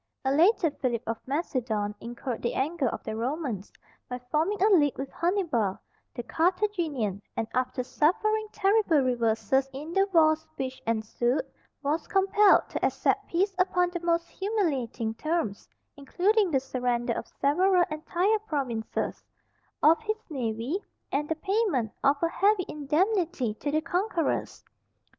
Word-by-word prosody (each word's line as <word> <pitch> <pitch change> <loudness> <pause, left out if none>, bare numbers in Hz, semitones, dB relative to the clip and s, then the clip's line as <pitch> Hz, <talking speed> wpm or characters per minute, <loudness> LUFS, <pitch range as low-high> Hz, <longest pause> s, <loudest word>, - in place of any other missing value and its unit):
A 265 - +2
later 335 +3 +4
Philip 245 -4 -2
of 225 0 -3
Macedon 245 -8 -1
incurred 240 +1 -5
the 235 - -1
anger 290 0 0
of - - -6
the 220 - -4
Romans 240 - -3 0.4
by 250 - -3
forming 345 +7 +1
a 385 - +4
league 290 -5 +3
with 270 0 -5
Hannibal, 330 - 0 0.4
the 240 - -4
Carthaginian, 325 - 0 0.2
and 225 - -1
after 255 0 -1
suffering 430 - +1
terrible 395 -6 +3
reverses 250 +2 +1
in 295 +5 -7
the 390 +1 +3
wars 315 -2 +4
which 260 -1 -4
ensued, 230 +3 0 0.4
was 295 +4 -1
compelled 395 +1 +4
to - - -4
accept - - +1
peace 380 +4 +1
upon 360 -1 +2
the 350 - -3
most 340 0 0
humiliating 280 - -1
terms, 310 -5 -2 0.3
including 375 +8 +1
the 275 -5 +2
surrender 245 -2 -1
of - - -5
several 360 +6 +4
entire 360 +7 +1
provinces; 270 - -3 0.6
of 320 +5 +6
his 435 -1 -2
navy, 250 - -2 0.3
and 295 +2 -1
the 320 - +1
payment 370 - 0
of 275 +1 +5
a - - +4
heavy 390 +2 +2
indemnity 310 - 0
to 290 - -4
the 310 +2 +1
conquerors. 355 0 -1
305 Hz, 140 wpm, -27 LUFS, 250-365 Hz, 0.6 s, of